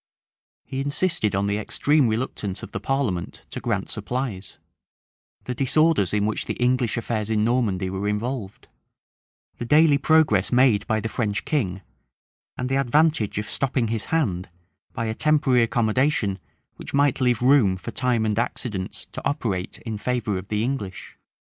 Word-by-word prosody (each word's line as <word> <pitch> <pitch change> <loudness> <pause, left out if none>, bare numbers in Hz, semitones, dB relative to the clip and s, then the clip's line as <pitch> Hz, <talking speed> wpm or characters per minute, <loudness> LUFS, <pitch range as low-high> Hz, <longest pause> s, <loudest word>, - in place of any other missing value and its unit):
He 135 - -4
insisted 145 - 0
on 100 +1 +1
the 100 +1 0
extreme 145 +5 +2
reluctance 110 -4 -3
of - - -8
the - - -4
parliament 130 -11 -2
to - - -4
grant - - -2
supplies; 120 -7 -4 0.9
the 125 - -3
disorders 135 - +2
in 105 -1 +1
which 110 - -1
the - - -3
English 125 -1 +1
affairs 110 -2 -2
in 110 -1 +1
Normandy 110 -6 +1
were 95 +2 -3
involved; 105 -1 -3 0.9
the - - -3
daily 150 +2 +5
progress 150 - +3
made 125 -5 +4
by 110 0 +1
the 110 - -2
French 105 -2 -2
king; 95 - -1 0.7
and 125 - -2
the 135 +1 +1
advantage 145 -5 +2
of 105 - -2
stopping 130 -4 0
his 110 -1 -2
hand 100 - -1 0.4
by 115 - -3
a 110 - -1
temporary 145 -2 +3
accommodation 115 -2 +1 0.4
which - - -6
might 140 -1 +2
leave 125 -2 +2
room 125 -8 +4
for - - -7
time 125 -3 +1
and 110 0 0
accidents 105 -5 -4
to - - -6
operate 100 -10 -2
in 110 -3 -4
favor 120 -3 -1
of 95 - -10
the 105 +1 -1
English. 115 -7 -4
115 Hz, 160 wpm, -24 LUFS, 105-135 Hz, 0.9 s, daily